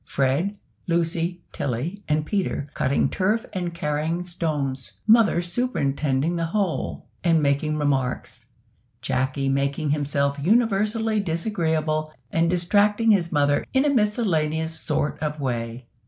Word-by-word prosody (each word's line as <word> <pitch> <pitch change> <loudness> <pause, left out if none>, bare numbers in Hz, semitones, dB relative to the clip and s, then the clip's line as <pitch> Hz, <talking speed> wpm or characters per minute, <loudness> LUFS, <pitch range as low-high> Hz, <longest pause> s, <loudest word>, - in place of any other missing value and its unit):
Fred, 140 +10 0 0.3
Lucy, 170 +1 0
Tilly, 140 - -3
and 150 0 +1
Peter 190 -6 -1
cutting 135 +2 +1
turf 210 +4 0
and 175 -2 -2
carrying 160 +1 -2
stones. 150 -7 -3
Mother 215 -6 +5
superintending 160 - 0
the 165 0 -1
whole, 195 -1 -2 0.2
and 165 -2 +4
making 150 +1 +1
remarks. 135 -4 -1 0.6
Jacky 130 +1 0
making 140 +2 0
himself 140 -1 0
universally 220 +2 +2
disagreeable, 160 -4 -1 0.2
and 165 0 +2
distracting 205 +5 +3
his 175 -5 +2
mother 145 -1 +2
in 265 +2 +3
a 290 - +3
miscellaneous 160 - 0
sort 150 -1 -1
of 150 0 -2
way. 120 -2 -3
160 Hz, 120 wpm, -24 LUFS, 145-195 Hz, 0.6 s, Mother